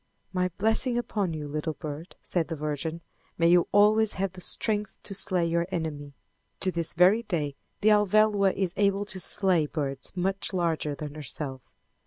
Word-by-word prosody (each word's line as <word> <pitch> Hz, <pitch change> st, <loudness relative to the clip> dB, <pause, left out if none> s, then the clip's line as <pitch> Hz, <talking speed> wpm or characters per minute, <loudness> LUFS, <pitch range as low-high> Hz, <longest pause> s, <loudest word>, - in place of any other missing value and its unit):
"My 180 Hz, 0 st, 0 dB
blessing 225 Hz, +4 st, +1 dB
upon 205 Hz, -6 st, -2 dB
you, 150 Hz, -1 st, -5 dB
little 155 Hz, +2 st, -3 dB
bird," 155 Hz, +4 st, -8 dB
said 170 Hz, -4 st, 0 dB
the 165 Hz, -, -4 dB
Virgin. 155 Hz, +2 st, -4 dB, 0.4 s
"May 165 Hz, 0 st, +3 dB
you 175 Hz, 0 st, +4 dB
always 210 Hz, +1 st, +4 dB
have 195 Hz, 0 st, -2 dB
the 185 Hz, 0 st, -12 dB
strength 210 Hz, +1 st, -1 dB
to 200 Hz, -, -5 dB
slay 185 Hz, -2 st, +3 dB
your 170 Hz, +1 st, 0 dB
enemy." 150 Hz, -5 st, -5 dB, 0.5 s
To 190 Hz, -, 0 dB
this 170 Hz, -2 st, +1 dB
very 185 Hz, +6 st, +5 dB
day 155 Hz, -10 st, -2 dB, 0.3 s
the 215 Hz, -, +4 dB
Alvéloa 210 Hz, -1 st, +3 dB
is 190 Hz, -2 st, -2 dB
able 200 Hz, 0 st, +1 dB
to 195 Hz, -2 st, -4 dB
slay 180 Hz, -4 st, +4 dB
birds 140 Hz, -3 st, -4 dB
much 190 Hz, +2 st, -1 dB
larger 165 Hz, -5 st, -1 dB
than 150 Hz, 0 st, -7 dB
herself. 140 Hz, -2 st, -4 dB
180 Hz, 170 wpm, -27 LUFS, 155-200 Hz, 0.5 s, very